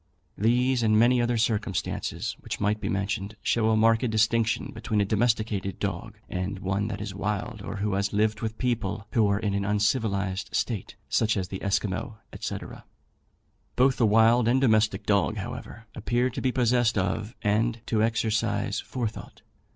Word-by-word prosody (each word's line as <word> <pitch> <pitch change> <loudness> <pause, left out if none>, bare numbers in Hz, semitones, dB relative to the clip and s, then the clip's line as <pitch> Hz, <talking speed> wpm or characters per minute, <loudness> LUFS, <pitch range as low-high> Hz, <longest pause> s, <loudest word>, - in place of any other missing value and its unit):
These, 125 +4 +2
and 110 -1 +3
many 120 +2 +4
other 120 0 +1
circumstances 110 -4 -1
which - - -5
might 105 +1 0
be - - -2
mentioned, 100 +1 -2
show 110 -1 +2
a 110 - +3
marked 115 +2 +3
distinction 110 +1 +1
between 110 -1 -2
a 100 - +3
domesticated 110 -2 0
dog 105 +3 -4
and 95 +2 -3
one 95 +2 -1
that 105 -3 -4
is 105 -2 -5
wild, 105 +3 -3
or 100 +1 -6
who 105 0 -1
has 100 +1 0
lived 105 +1 +1
with 110 -1 -3
people 110 -5 -2
who 110 -4 +3
are 100 0 +2
in 105 -2 -1
an 100 0 0
uncivilized 100 -2 0
state, 110 -6 -2
such 110 -1 +1
as 95 -2 -2
the 95 - -6
Esquimaux, 100 +2 -1 0.2
&c. - - -3 1.2
Both 130 +1 +3
the 115 - +4
wild 115 +2 +5
and 125 +3 +4
domestic 110 -5 +2
dog, 100 -3 +2
however, 115 - -7
appear 120 +3 0
to - - -5
be 130 - +1
possessed 120 -2 +2
of 105 +4 -1
and 110 +3 +1
to 110 -2 +1
exercise 110 -2 0
forethought. 115 -4 -6
110 Hz, 165 wpm, -26 LUFS, 100-115 Hz, 1.2 s, wild